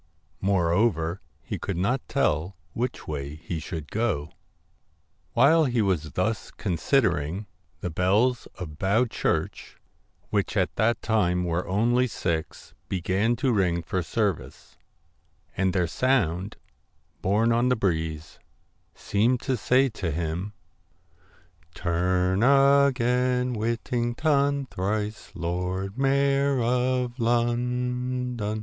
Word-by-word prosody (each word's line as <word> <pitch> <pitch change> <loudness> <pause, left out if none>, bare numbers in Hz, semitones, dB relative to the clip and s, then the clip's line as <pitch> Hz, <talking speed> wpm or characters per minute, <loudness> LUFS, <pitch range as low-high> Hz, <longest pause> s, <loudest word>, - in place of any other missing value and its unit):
Moreover 90 -1 +1 0.2
he - - -5
could 95 -4 -3
not 120 +8 +1
tell 85 +5 0 0.2
which 125 +1 -3
way 70 -1 -4
he 80 +1 -5
should 80 -2 -6
go. 95 -10 -1 1.0
While 155 +6 +5
he 125 -3 0
was 85 -6 -1
thus 110 +4 -1
considering, 90 - 0 0.4
the 90 - -3
bells 105 +9 +2
of 80 -5 -8
Bow 100 +6 +3
Church, 115 - -2 0.5
which - - 0
at - - +1
that 115 +2 +1
time 90 -5 +1
were 85 0 -1
only 120 +6 +2
six, 85 -8 -4 0.2
began 95 +5 +1
to 130 +1 +1
ring 90 -5 +1
for 95 +3 -1
service, 100 +1 -3 0.8
and 95 0 +1
their 90 -1 +1
sound, 100 -3 0 0.6
borne 110 +5 +2
on 120 +2 +2
the 125 - +3
breeze, 80 -6 -2 0.6
seemed 115 +5 +1
to 135 - 0
say 125 +4 +3
to 95 -6 -4
him 85 +5 -3 0.6
* 85 0 -32
Turn 90 +2 +1
a 140 +2 +5
gain, 125 0 +1
Whitt 115 +1 -2
ing 120 0 0
ton, 140 -1 +2
Thrice 105 0 -3
Lord 90 +2 -3
Mayor 140 0 +2
of 125 +1 0
Lon 125 +1 0
don.' 105 0 -2
105 Hz, 120 wpm, -26 LUFS, 90-125 Hz, 1.0 s, While